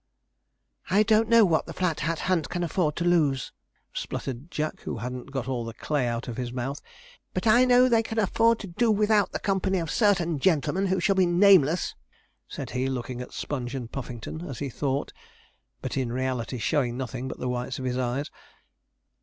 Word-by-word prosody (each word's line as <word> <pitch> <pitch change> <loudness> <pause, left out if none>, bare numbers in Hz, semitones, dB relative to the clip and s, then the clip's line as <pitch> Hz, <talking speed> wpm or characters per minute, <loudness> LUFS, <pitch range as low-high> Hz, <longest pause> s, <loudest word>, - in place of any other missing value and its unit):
'I 200 +4 +4
don't 220 +1 +3
know 230 -2 +7
what 165 -4 +1
the - - -6
Flat 180 -4 0
Hat 165 +2 -1
Hunt 180 -4 0
can 175 0 -2
afford 160 -2 0
to 170 - -2
lose,' 155 -7 +2 0.4
spluttered 135 +4 -5
Jack, 155 -2 -3
who - - -4
hadn't 125 +3 -6
got 135 -2 -4
all 125 -3 -2
the 115 0 -7
clay 145 -2 -1
out 120 +1 -3
of 120 - -5
his 125 -2 -3
mouth; 130 +3 -4 0.5
'but 185 - -2
I 240 +3 +6
know 250 0 +6
they 230 -2 +4
can 225 0 -6
afford 225 +2 +3
to 200 - -6
do 220 +7 +1
without 210 -1 +3
the - - -2
company 190 -1 0
of 165 -3 -2
certain 180 - +2
gentlemen 185 +4 +2
who 190 0 +1
shall 195 +3 +3
be 190 -2 +3
nameless,' 175 -3 +4 0.5
said - - -6
he, 125 +1 -1
looking 125 -1 -4
at 125 - -8
Sponge 130 -3 -4
and 120 -3 -5
Puffington 125 +3 -6
as 135 - -6
he 140 - -3
thought, 135 +2 -2 0.7
but - - -3
in 130 -3 -1
reality 130 -1 -2
showing 125 -1 0
nothing 130 0 -4
but - - -6
the 125 - -4
whites 125 +1 -3
of 130 - -5
his 125 0 -1
eyes. 130 +4 -2
150 Hz, 195 wpm, -26 LUFS, 125-190 Hz, 0.7 s, know